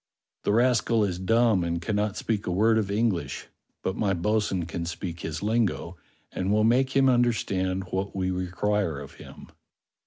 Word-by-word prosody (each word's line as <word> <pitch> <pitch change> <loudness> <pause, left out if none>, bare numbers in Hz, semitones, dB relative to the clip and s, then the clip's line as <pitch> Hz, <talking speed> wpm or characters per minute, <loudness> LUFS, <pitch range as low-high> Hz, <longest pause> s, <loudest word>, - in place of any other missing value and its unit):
"The - - +2
rascal 115 -1 +3
is 90 -3 -1
dumb 110 0 +3
and 85 0 -1
cannot 105 +2 -1
speak 110 -3 -2
a - - 0
word 110 +5 +3
of 100 -3 -2
English; 105 -3 -1 0.4
but 95 - -1
my 100 -3 0
bo'sun 100 -1 0
can 85 0 -4
speak 85 0 -5
his 80 +3 -5
lingo 105 -5 0 0.4
and 95 +2 -2
will 105 +1 +3
make 130 +4 +2
him 135 0 +5
under 120 -2 +4
stand 95 -3 -2
what 95 +2 -2
we 95 -1 -1
require 90 -2 -1
of 70 - -10
him." - - -12
100 Hz, 175 wpm, -26 LUFS, 90-110 Hz, 0.4 s, him